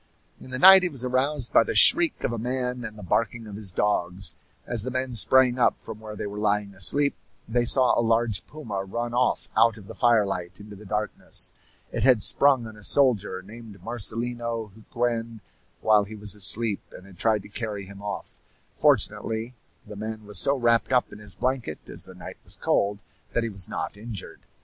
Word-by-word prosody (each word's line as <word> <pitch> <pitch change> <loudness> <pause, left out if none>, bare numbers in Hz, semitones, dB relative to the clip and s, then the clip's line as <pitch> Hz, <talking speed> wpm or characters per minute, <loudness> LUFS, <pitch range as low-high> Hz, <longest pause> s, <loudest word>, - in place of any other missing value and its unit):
In - - -13
the 130 - -4
night 190 +7 +9
he 180 - 0
was 135 -5 -4
aroused 130 +1 0
by - - +6
the - - -4
shriek 340 -2 +6
of 120 - -1
a 115 - -4
man 125 +1 -3
and 110 -2 -7
the 105 - -10
barking 115 +5 -1
of 105 -2 -9
his 100 -3 -1
dogs. 90 -3 +1 0.3
As 120 -3 +3
the 125 - -2
men 130 0 -3
sprang 125 +2 +4
up - - +2
from 110 - -10
where 110 -1 -9
they - - -5
were 105 0 -6
lying 105 -1 0
asleep 140 +10 +2 0.3
they 120 +1 0
saw 130 +1 +4
a - - +2
large 115 -2 0
puma 110 -11 -6
run 120 +5 -4
off 125 +1 0
out 115 0 +4
of 105 - -13
the - - -10
firelight 100 -6 0
into 105 0 -11
the 105 +1 -13
darkness. 105 +2 -1 0.4
It - - -2
had 125 -5 +4
sprung 135 -4 +4
on 110 -1 -10
a - - -14
soldier 105 -7 +3
named 110 0 -12
Marcelino 115 0 -2
Huquen 115 +1 -3 0.4
while 105 -2 +4
he 110 +2 -10
was 105 -1 -2
asleep, 105 +1 0
and 90 - -13
had 95 -3 -16
tried 110 -3 +1
to - - -13
carry 105 -2 -4
him 100 +1 -12
off. 100 0 -7 0.3
Fortunately, 115 +2 0 0.3
the 105 - -10
man 110 +1 -6
was 105 -2 -2
so 140 +9 +2
wrapped 120 -1 +1
up 125 -1 +1
in - - -11
his 105 -2 -3
blanket, 125 - -2
as - - -6
the - - -13
night - - -10
was - - -8
cold, 100 0 0 0.4
that 115 - 0
he 115 - -2
was 95 -4 -1
not - - -4
injured. 105 -1 -9
110 Hz, 200 wpm, -25 LUFS, 105-120 Hz, 0.4 s, night